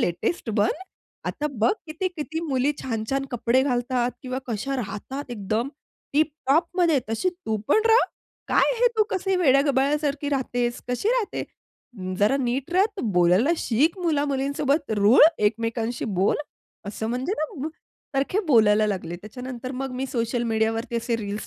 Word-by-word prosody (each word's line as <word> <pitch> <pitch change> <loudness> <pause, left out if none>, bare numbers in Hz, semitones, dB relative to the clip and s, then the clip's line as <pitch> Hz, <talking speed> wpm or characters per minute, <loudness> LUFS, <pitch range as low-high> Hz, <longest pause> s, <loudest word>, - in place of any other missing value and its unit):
Latest 225 - -1
बन." 210 0 +2 0.6
आता 300 - -2
बघ, 220 - +4
किती-किती 320 -1 -3
मुली, 270 +1 +2
छान-छान 255 +3 -2
कपडे 245 +1 +2
घालतात 245 -2 0
किंवा 255 0 -3
कशा 250 +4 -2
राहतात 250 +5 -5
एकदम 220 +2 -2 0.4
टिप-टॉपमध्ये 310 +2 +2
तशी 225 +12 0
तू 345 -12 -4
पण 435 - +5
रहा. 455 +2 +6 0.4
काय - - +3
हे - - +6
तू 435 - +5
कसं 385 -1 0
वेड्या-गबाळ्यासारखी 285 0 +2
राहतेस? 245 -3 -1
कशी 250 - 0
राहते? 480 -3 0 0.7
जरा 210 +6 +3
नीट 265 +3 -2
रहा. 375 +2 +5 0.3
बोलायला 180 - +4
शिक 300 - +1
मुला-मुलींसोबत. 285 -3 0
रुळ 210 +6 +6 0.2
एकमेकांशी 230 +2 -1
बोल." 195 -3 +1 0.5
असं 220 +2 -4
म्हणजे 255 +9 -1
ना 310 +4 -2
मग 305 +4 -3 0.5
सारखे 280 +9 +1
बोलायला 215 -6 +5
लागले, 185 -4 -3
त्याच्यानंतर 250 +6 -7
मग 270 0 -3
मी 255 +1 -3
सोशल 235 -1 -1
मीडियावरती 225 +2 0
असे 230 0 -1
रील्स 210 -1 -5
260 Hz, 135 wpm, -24 LUFS, 225-295 Hz, 0.7 s, रहा